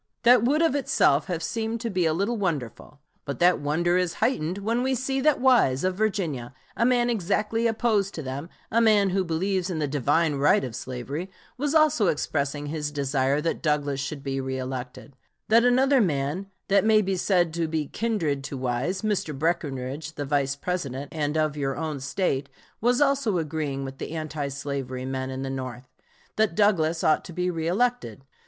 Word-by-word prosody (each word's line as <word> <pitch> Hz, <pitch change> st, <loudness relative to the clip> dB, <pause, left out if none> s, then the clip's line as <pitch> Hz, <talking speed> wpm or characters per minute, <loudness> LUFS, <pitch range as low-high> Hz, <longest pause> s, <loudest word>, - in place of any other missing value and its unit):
That 245 Hz, -1 st, +7 dB
would 295 Hz, +7 st, +3 dB
of 325 Hz, -, +3 dB
itself 160 Hz, -, +2 dB
have 170 Hz, -3 st, -3 dB
seemed 225 Hz, +5 st, -2 dB
to 235 Hz, -, -2 dB
be 180 Hz, -3 st, +1 dB
a 155 Hz, -, +1 dB
little 200 Hz, +7 st, 0 dB
wonderful, 150 Hz, -, -4 dB, 0.2 s
but 140 Hz, -3 st, -5 dB
that 175 Hz, +1 st, +4 dB
wonder 170 Hz, +5 st, +1 dB
is 180 Hz, -2 st, 0 dB
heightened 180 Hz, -8 st, 0 dB
when 225 Hz, +4 st, -1 dB
we 260 Hz, +1 st, +1 dB
see 265 Hz, +2 st, -1 dB
that 305 Hz, +1 st, +3 dB
Wise, 240 Hz, -, +4 dB
of 185 Hz, 0 st, +1 dB
Virginia, 175 Hz, -, -2 dB, 0.2 s
a 235 Hz, -, +2 dB
man 245 Hz, -1 st, +3 dB
exactly 220 Hz, +1 st, 0 dB
opposed 220 Hz, -3 st, +1 dB
to 160 Hz, -, -5 dB
them, 135 Hz, +5 st, -5 dB, 0.2 s
a 230 Hz, -, +3 dB
man 210 Hz, -4 st, +4 dB
who 190 Hz, +1 st, +1 dB
believes 185 Hz, +2 st, -1 dB
in 175 Hz, -, -2 dB
the 150 Hz, -2 st, 0 dB
divine 145 Hz, +3 st, +1 dB
right 140 Hz, 0 st, +4 dB
of 125 Hz, -4 st, -5 dB
slavery, 135 Hz, +9 st, -5 dB, 0.3 s
was 285 Hz, +4 st, -1 dB
also 305 Hz, -10 st, +4 dB
expressing 145 Hz, -2 st, -1 dB
his 150 Hz, 0 st, -3 dB
desire 140 Hz, -1 st, 0 dB
that 165 Hz, -, -2 dB
Douglas 145 Hz, -3 st, 0 dB
should 140 Hz, 0 st, -5 dB
be 135 Hz, -1 st, -2 dB
reëlected; 130 Hz, 0 st, -5 dB, 0.4 s
that 230 Hz, +2 st, +6 dB
another 260 Hz, +2 st, +4 dB
man 155 Hz, +1 st, -1 dB, 0.2 s
that 200 Hz, 0 st, +4 dB
may 215 Hz, -1 st, +4 dB
be 190 Hz, 0 st, -1 dB
said 175 Hz, -3 st, +1 dB
to 165 Hz, -1 st, -1 dB
be 155 Hz, -1 st, -1 dB
kindred 165 Hz, -8 st, -1 dB
to 140 Hz, -1 st, -5 dB
Wise, 130 Hz, -, -2 dB
Mr. 195 Hz, -9 st, -1 dB
Breckinridge, 145 Hz, -2 st, -2 dB
the 145 Hz, -, -3 dB
Vice 140 Hz, -1 st, 0 dB
President, 140 Hz, -4 st, -4 dB
and 150 Hz, -1 st, -1 dB
of 155 Hz, -1 st, +1 dB
your 135 Hz, -2 st, -2 dB
own 155 Hz, -2 st, -3 dB
State, 135 Hz, +1 st, -1 dB, 0.3 s
was 245 Hz, +4 st, +2 dB
also 275 Hz, -8 st, +2 dB
agreeing 150 Hz, -4 st, -2 dB
with 135 Hz, 0 st, -8 dB
the -, -, -5 dB
anti 155 Hz, -2 st, -3 dB
slavery 135 Hz, -2 st, -4 dB
men 130 Hz, 0 st, -3 dB
in 130 Hz, 0 st, -4 dB
the 135 Hz, -, -3 dB
North, 130 Hz, -1 st, -6 dB, 0.5 s
that 215 Hz, -6 st, +2 dB
Douglas 170 Hz, -6 st, +2 dB
ought 155 Hz, -, +3 dB
to 180 Hz, -, -9 dB
be 180 Hz, +1 st, -1 dB
reëlected. 175 Hz, -, -1 dB
160 Hz, 185 wpm, -25 LUFS, 140-210 Hz, 0.5 s, That